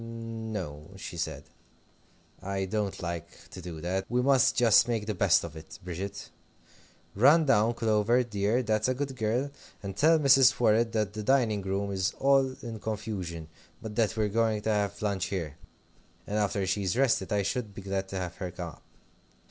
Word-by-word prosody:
"N 115 -1 -6
o," 75 -4 -7
she 90 - -7
said; 80 -4 -4 1.0
"I 95 0 -2
don't 100 -1 -3
like 85 -1 -4 0.2
to 90 - -9
do 85 -2 -7
that. 95 +3 -2
We 125 +1 +1
must 135 0 +4
just 115 -3 +5
make 115 -3 -1
the 110 - -2
best 95 -2 +3
of 85 -2 -7
it, 80 0 -10
Bridget. 95 +3 -6 0.8
Run 145 +10 +5
down, 120 -3 +3
Clover, 115 +2 +2
dear, 105 +2 0
that's 110 -1 +1
a 130 - 0
good 135 0 -3
girl! 125 +5 -1 0.3
and 95 -1 -5
tell 160 +9 +5
Mrs. 135 -3 +5
Worrett 115 0 +3
that 105 -3 0
the 110 - -5
dining 110 -3 +2
room 100 +1 -2
is 95 +3 -1
all 135 -1 +3
in 115 -2 -6
confusion, 100 -7 -5 0.3
but 110 -2 -7
that 115 -2 +1
we're 110 -1 +2
going 110 0 +1
to 110 - +1
have 100 -1 -1
lunch 100 -3 0
here, 85 -6 -4 0.7
and, 105 +1 -2
after 100 -1 0
she's 95 +2 -1
rested, 135 -3 +2
I 100 -1 +1
should 105 0 -3
be 100 - -8
glad 95 0 -2
to 95 - -7
have 90 -2 -5
her 90 - -4
come 90 0 -6
up. - - -16
105 Hz, 185 wpm, -28 LUFS, 95-115 Hz, 1.0 s, just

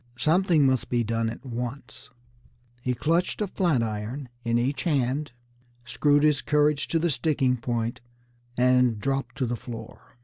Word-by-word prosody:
Something 160 +3 +3
must 130 -2 +1
be 120 -1 +1
done 115 0 -1
at 115 - -9
once. 120 -1 -6 0.7
He 125 0 -1
clutched 165 +8 0
a 210 - +1
flat 175 -10 +1
iron 115 +5 -4
in 115 0 +1
each 130 +3 -1
hand, 145 -2 0 0.5
screwed 145 +4 +2
his 150 -3 +3
courage 150 -1 +2
to 165 - 0
the 165 0 +1
sticking 130 -1 +1
point, 115 -1 -3 0.6
and 125 -2 +3
dropped 135 -1 -2
to 130 - 0
the 120 0 -2
floor. 115 0 -10
130 Hz, 150 wpm, -26 LUFS, 120-150 Hz, 0.7 s, Something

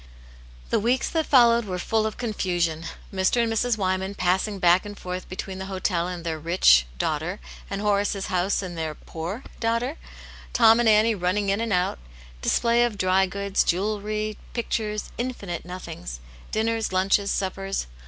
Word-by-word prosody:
The - - +3
weeks 245 +4 +1
that 320 -2 0
followed 235 -3 +5
were 185 -3 -3
full 220 +4 0
of 215 - -6
confusion; 175 -8 -1 0.3
Mr. 190 +5 +2
and 225 -1 0
Mrs. 230 +1 +1
Wyman 190 0 -1
passing 190 +3 +1
back 180 0 +4
and 205 -1 -8
forth 180 0 -6
be 185 - -6
tween 190 0 -5
the 190 - -5
hotel 185 -2 -1
and 180 -2 -5
their 160 -2 -3
rich 150 - +5
(?) - - -21
daughter, - - -2 0.3
and 200 - -3
Horace's 205 -1 +1
house 185 +1 0
and 180 -2 -6
their 160 -2 -3
poor 175 - -6
(?) - - -21
daughter; 230 +6 0 0.6
Tom 225 -1 +6
and 240 -2 +4
Annie 215 +1 +5
running 195 +1 0
in 200 +3 +1
and 230 -1 -2
out; 180 - +1 0.4
display 235 0 +3
of 235 -4 -1
dry 190 0 +3
goods, 200 +1 0
jewellery, 210 +3 -1
pictures, 215 -3 -2
infinite 205 -10 -4
nothings; 120 - -7 0.3
dinners, 225 0 0
lunches, 195 +2 +2
suppers. 195 0 -2
200 Hz, 170 wpm, -25 LUFS, 180-220 Hz, 0.6 s, Tom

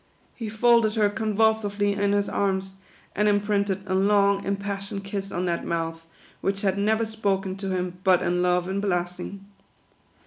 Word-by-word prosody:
He 225 -3 -6
folded 225 0 +3
her 210 -2 +3
convulsively 210 -1 +1
in 200 0 +1
his 205 0 +1
arms, 190 -1 -1 0.4
and 210 +1 +2
imprinted 205 -1 0
a 190 - -2
long, 200 +1 +3
impassioned 200 0 -3
kiss 195 0 -5
on 180 +1 -2
that 170 -1 -1
mouth, 165 -1 -3 0.3
which 195 0 -1
had 190 -2 +2
never 215 +3 +1
spoken 200 -3 -1
to 195 0 -4
him 180 -1 -3
but 185 -1 +4
in 180 +1 +1
love 180 0 +2
and 195 +1 -2
blessing. 180 +1 -3
200 Hz, 160 wpm, -25 LUFS, 190-205 Hz, 0.4 s, but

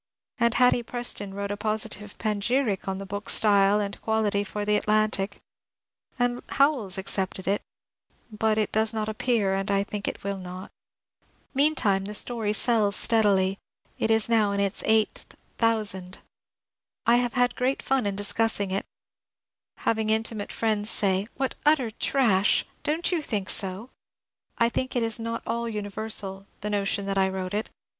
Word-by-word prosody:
And 235 0 +2
Hatty 250 -1 +4
Preston 235 -4 -2
wrote 200 0 -3
a 205 - -3
positive 210 -1 -2
panegyric 215 0 0
on 190 0 -2
the 195 - -6
book's 205 +1 0
style 205 -1 +4
and 205 -1 -4
quality 215 -2 0
for 205 +1 -4
the 210 - 0
^^ - - +4
Atlantic," 215 -2 0 0.8
and 245 0 0
Howells 275 -10 +2
accepted 190 -1 -1
it, 200 +1 +1 0.4
— - - -67 0.3
but 215 0 0
it 215 -2 0
does 220 +1 +1
not 215 -1 -1
appear, 215 -3 +1
and 195 +1 -2
I 200 0 +2
think 205 0 -4
will 200 0 -3
not. 185 +1 -8 0.8
Meantime 260 -9 +2
the 210 +1 -5
story 225 -2 0
sells 215 -2 +2
steadily 200 -4 +2 0.2
— - - -37
is 225 -1 +3
now 220 -3 +3
in 200 - -1
its 200 0 0
eighth 220 -1 +1 0.2
thousand. 205 -5 +1 0.9
I 235 +1 +5
have 245 -1 0
had 245 -1 +2
great 255 +2 -1
fun 265 -5 +1
in 200 - -2
discussing 205 0 0
it, 195 - -2 0.5
— - - -67
having 220 -1 +1
intimate 220 -1 0
friends 215 -2 0
say, 195 -1 +1
" - - -38
What 270 -1 -1
utter 295 -6 +3
trash! 215 -5 +2 0.2
Don't 320 +5 0
you 345 -3 0
think 210 -9 -1
so? 195 +5 +1 0.3
" - - -67 0.3
I 235 - +4
think 255 +2 -3
it 245 - +1
is 225 0 +1
not 230 0 -4
all 235 0 -2
universal 205 -2 -3
— - - -38
the 210 0 -3
notion 200 -1 0
that 195 0 0
I 190 0 +3
wrote 190 0 -4
it. 215 +2 -2
210 Hz, 170 wpm, -26 LUFS, 200-230 Hz, 0.9 s, I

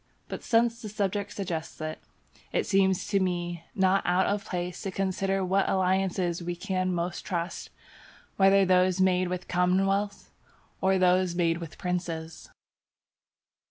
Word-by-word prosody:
But - - -6
since 235 0 +2
the 215 - -6
subject 205 -1 -2
suggests 170 -5 -5
it, 155 0 -4 0.5
it - - 0
seems 190 -2 +2
to 200 -2 +2
me 175 -2 -2
not 190 0 +3
out 180 +2 +2
of 200 0 -1
place 180 -1 -4
to 195 - -3
consider 195 0 -1
what 190 +2 +1
alliances 185 -2 +1
we 175 0 -3
can 185 0 -1
most 175 0 -2
trust, 175 -1 -4 0.7
whether 195 0 +5
those 185 0 +3
made 185 -1 +3
with 180 0 -4
commonwealths 195 +3 +1 0.5
or 190 0 +3
those 180 -1 +3
made 170 -1 +1
with 165 -2 -8
princes. 170 -3 -4
185 Hz, 140 wpm, -28 LUFS, 175-195 Hz, 0.7 s, whether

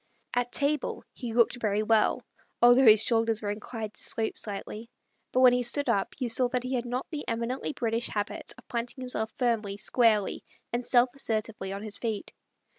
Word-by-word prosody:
At 245 0 -1
table, 290 0 -1
he 240 -3 -6
looked 235 +1 +2
very 210 -1 0
well, 220 0 +2 0.3
although 245 +1 +6
his 215 0 +8
shoulders 225 -2 +2
were 205 - -1
inclined 215 0 -6
to - - -3
slope 220 -1 +1
slightly; 210 +2 -5 0.4
but 255 - +2
when 250 -1 +7
he 250 - +1
stood 265 +4 +3
up 195 - 0
you 255 - -2
saw 245 +2 +3
that 250 -1 -2
he 255 +1 -4
had 245 -1 -1
not 250 +2 -3
the 300 -2 -4
emi 235 +1 -2
nently 280 - -5
British 230 0 -1
habit 205 -1 -3
of 250 - -18
planting 240 +2 -4
himself 220 -3 +1
firmly, 225 -5 -1
squarely, 215 -1 +1 0.3
and 240 +1 -1
self 245 0 +4
assertively 220 -6 -3
on 200 +1 -6
his 215 -2 -4
feet. 220 -4 -4
230 Hz, 190 wpm, -28 LUFS, 215-250 Hz, 0.4 s, his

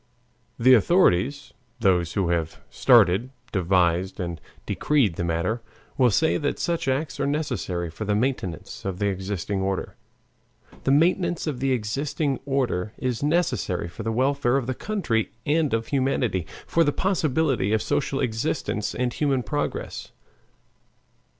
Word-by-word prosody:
The 130 +2 +6
authorities, 135 - +3 0.3
those 90 -6 +2
who 95 -4 0
have 85 -2 -1
started, 95 +9 +4 0.2
devised, 90 -1 +1
and 85 -2 -4 0.2
decreed 135 - +1
the - - -2
matter, 85 +8 -1 0.3
will 125 -2 +4
say 160 +10 +2
that 145 -2 -1
such 170 -5 -1
acts 135 +3 -1
are - - +1
necessary 120 - -2
for 110 - -6
the 105 0 0
maintenance 105 - -2
of 95 -2 -3
the 100 +1 +1
existing 95 0 -3
order; 95 0 -2 0.9
the 135 - +3
maintenance 170 +3 +2
of 145 -6 -3
the 135 +1 +1
existing 135 +5 -1
order 120 -7 -1
is 125 -3 -2
necessary 150 - 0
for 85 +6 -9
the 115 +1 -2
welfare 130 +1 +2
of 135 - -1
the 130 - -1
country 130 - -1
and 155 0 +2
of 115 0 -1
humanity, 130 - 0 0.2
for 165 - +3
the 145 - +2
possibility 150 - +1
of 110 0 +1
social 140 -1 -1
existence 115 -2 -2
and 125 -1 -1
human 135 -4 0
progress. 105 - -4
120 Hz, 145 wpm, -25 LUFS, 95-140 Hz, 0.9 s, The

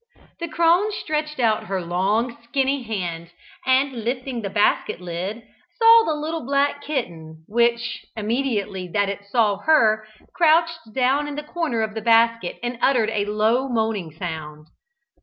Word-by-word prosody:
The 340 - -3
crone 340 +6 +3
stretched 305 -7 -3
out 220 -2 +1
her 195 -2 -2
long, 195 +7 0
skinny 270 +3 0
hand, 175 -7 -4 0.4
and 260 -2 +2
lifting 250 +1 -3
the 200 - -4
basket 205 -2 +1
lid, 180 +6 -5 0.3
saw 455 0 +7
the 315 - +1
little 315 +2 -4
black 280 +2 0
kitten; 165 - -5
which, 235 +1 0
immediately 215 -4 -2
that 200 +2 0
it 200 0 -5
saw 210 -1 +2
her, 220 -9 +3 0.3
crouched 330 -5 +2
down 265 +3 +2
in 290 - -5
the 295 - -5
corner 300 -7 -2
of 220 -1 -2
the 220 - -4
basket 230 -3 +3
and 240 -1 -3
uttered 235 -5 +3
a 205 -2 0
low 220 +6 +1
moaning 220 -7 -1
sound. 155 -2 -7
230 Hz, 150 wpm, -22 LUFS, 205-280 Hz, 0.4 s, saw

